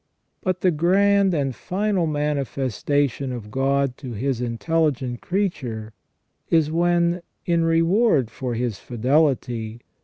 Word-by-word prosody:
But 185 -1 -1
the 185 - +4
grand 195 +4 +3
and 135 -3 0
final 190 - -1
manifes 140 -5 -2
tation 140 -2 +1
of 110 -4 -7
God 135 0 +1
to 130 -4 -7
His 125 +3 -2
intelligent 130 0 -1
creature 130 - -2 0.6
is 160 -2 +3
when, 175 +1 +2 0.2
in 170 -1 +2
reward 165 - +3
for 125 -3 -4
his 115 -3 -2
fidelity. 120 -3 0
145 Hz, 120 wpm, -23 LUFS, 125-170 Hz, 0.6 s, the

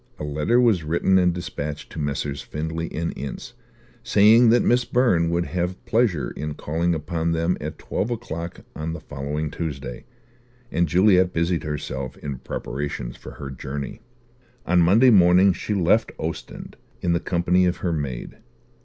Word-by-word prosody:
A - - -6
letter 75 +11 +1
was 110 -9 +3
written 85 +4 +2
and 90 -1 +3
dispatched 80 -4 -5
to - - -7
Messrs. 70 -1 -2
Findlay 80 +2 -4
& - - -11
Ince, 80 - -5 0.5
saying 115 +2 +6
that 120 +2 +4
Miss 125 +1 +3
Byrne 115 -9 +2
would 85 +1 0
have 90 +1 -3
pleasure 110 -9 +1
in 75 0 -5
calling 85 +3 -1
upon 80 +2 -1
them 85 +2 +1
at 75 +1 -5
twelve 105 - -3
o'clock 90 -8 -5
on 80 +1 -4
the 80 - -6
following 75 +1 -4
Tuesday; 70 -6 -5 0.7
and 85 +1 +1
Juliet 90 +2 +4
busied 85 +1 0
herself 70 -3 -4
in 70 -3 -6
preparations 65 -3 -5
for - - -11
her 70 -1 -7
journey. 70 - -6 0.6
On 90 0 +4
Monday 110 +10 +6
morning 90 -1 +6
she 105 +4 -3
left 95 +4 +2
Ostend, - - -6 0.2
in 85 - +1
the 85 - +2
company 90 +1 +2
of 90 - 0
her 85 - +1
maid. 70 -6 -4
85 Hz, 160 wpm, -23 LUFS, 75-90 Hz, 0.7 s, saying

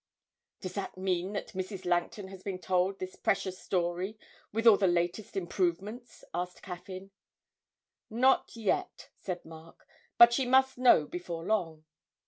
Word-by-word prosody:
'Does 185 -1 -5
that 195 -1 -5
mean 185 +1 -1
that 200 - -4
Mrs. 190 0 -5
Langton 175 +3 -1
has 190 -1 -11
been 190 -1 -4
told 185 +1 0
this 185 -1 -6
precious 190 -1 -1
story 180 +3 -2 0.3
with 225 +2 -2
all 225 -3 +9
the 195 -1 +2
latest 175 +4 -1
improvements?' 195 +6 -2
asked 180 0 -4
Caffyn. 185 +1 -8 1.0
'Not 255 +4 +2
yet,' 220 -4 -2
said 180 -2 -5
Mark, 160 0 -14 0.3
'but 235 0 +9
she 260 0 +1
must 265 0 +3
know 245 -11 +6
before 170 0 -6
long.' 170 -6 -1
185 Hz, 140 wpm, -30 LUFS, 175-210 Hz, 1.0 s, all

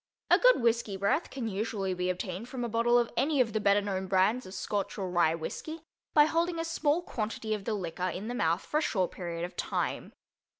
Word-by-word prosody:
A - - +7
good - - +5
whisky 230 -4 +1
breath 200 - +1
can 255 -4 -4
usually 200 -2 -2
be 180 0 -1
obtained 185 +5 -4
from 255 -2 -4
a - - -1
bottle 235 +2 +3
of 240 -1 +1
any 290 0 +1
of 230 -4 +2
the 215 - +1
better 205 0 +4
known 190 -2 -3
brands 195 +6 +2
of 185 - -9
Scotch 200 +1 -2
or 190 -3 -3
Rye 170 -2 +3
whisky 315 - -6 0.3
by 295 -1 +8
holding 335 +2 0
a 330 - -2
small 325 0 +1
quantity 220 -4 -3
of 205 -2 -4
the 220 - 0
liquor 180 -1 -3
in 195 +4 -5
the 240 - -3
mouth 170 -6 +1
for 300 - 0
a - - -1
short 190 - 0
period 170 -2 -4
of 180 - -10
time. - - -2
210 Hz, 225 wpm, -30 LUFS, 185-245 Hz, 0.3 s, by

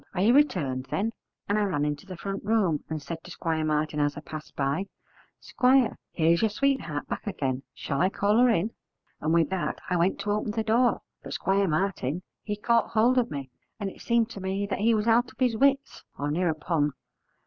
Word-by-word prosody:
are 180 - 0
you 230 +4 +5
returned, 145 - +2
then?' 220 +3 0 0.4
and 205 +1 +2
I - - +2
ran 180 -8 0
into 150 +4 -3
the 185 -2 -7
front 195 +2 -4
room, 200 -8 +1
and 160 -1 -2
said 165 +2 -7
to - - -12
Squire 160 -2 -2
Martin 155 0 0
as 145 0 +1
I - - -5
passed 155 0 -9
by, 140 +8 -1 0.5
'Squire, 255 -1 +3 0.2
here 165 -1 +3
is 170 - +3
your 220 - +3
sweetheart 210 - -1
back - - -5
again: 135 -9 -2
shall 140 -2 -2
I 185 - +4
call 205 +2 +1
her 250 0 +6
in?' 215 0 +1 0.5
and 155 - -1
with 165 0 +3
that 190 -2 -1
I 180 - +3
went 175 +3 +1
to 205 - -1
open 210 0 -1
the 220 0 -1
door; 235 +3 +2 0.2
but - - -7
Squire 195 +1 +1
Martin 170 -2 -1 0.2
he 210 - -3
caught 230 +2 +2
hold 240 +3 +4
of 240 - 0
me, 140 -3 -6 0.3
and 195 -2 -3
it - - -15
seemed 235 -1 +1
to 200 - -7
me 195 +2 -2
he 225 +2 +3
was 210 0 0
out 235 +2 +3
of - - -22
his 250 -3 +2
wits, 275 +3 +1
or 145 +1 -2
near 175 +3 +1
upon. 150 -2 0
190 Hz, 215 wpm, -27 LUFS, 155-225 Hz, 0.5 s, her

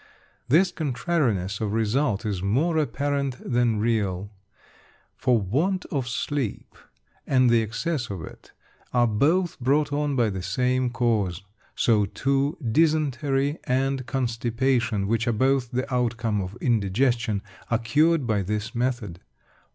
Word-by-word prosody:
This 175 +7 +4
contrariness 125 - -1
of 105 -1 -1
result 115 0 0
is 100 -4 -2
more 145 - +1
apparent 140 -1 -1
than 120 -3 +1
real; 100 -3 -1 0.8
for 125 -3 +2
want 155 - 0
of 135 -6 -1
sleep, 130 -2 -3 0.5
and 130 -2 +4
the 115 -1 +4
excess 120 +5 -2
of 95 -5 -5
it, - - -12 0.4
are 120 0 +5
both 155 - +1
brought 145 +3 +1
on 145 -1 0
by 115 -4 +2
the 95 -1 -4
same 125 +6 0
cause. 110 -7 0 0.3
So 105 -4 +3
too, 140 +6 0
dysentery 145 0 +1
and 130 0 0
constipation, 120 -3 0
which 115 +3 0
are 120 - +2
both 130 +2 +1
the 130 +2 -3
outcome 115 -4 0
of 95 +4 -6
indigestion, 115 -1 +1 0.3
are 115 - +2
cured 150 +6 +2
by 110 -3 +1
this 105 +4 -3
method. 120 -8 -2
120 Hz, 130 wpm, -25 LUFS, 110-140 Hz, 0.8 s, are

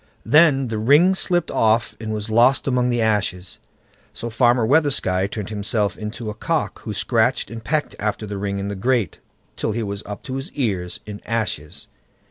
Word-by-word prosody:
Then 145 -4 +5
the 110 -1 -2
ring 145 - +5
slipped 175 -2 +1
off 115 +1 +2
and 110 -1 -5
was 105 0 -3
lost 120 +6 +4
among 125 -2 +2
the 120 -2 +1
ashes. 95 -4 -1 0.6
So 115 - -5
Farmer 120 0 +3
Weathersky 125 -9 +2
turned 105 -1 -5
himself 105 0 -1
into 110 +1 -5
a - - -6
cock, 110 - -2
who - - -6
scratched - - +1
and 115 -1 -7
pecked 155 +3 -1
after 105 +1 -2
the 100 -1 -5
ring 100 0 -2
in 100 0 -3
the 100 - -3
grate, 115 -2 0 0.4
till 110 - -2
he 115 +1 -2
was 100 -1 -4
up 105 0 -7
to 130 +1 -4
the 135 - -7
ears 95 -10 -2
in 105 -1 -8
ashes. 105 -10 -3
110 Hz, 185 wpm, -22 LUFS, 105-130 Hz, 0.6 s, Then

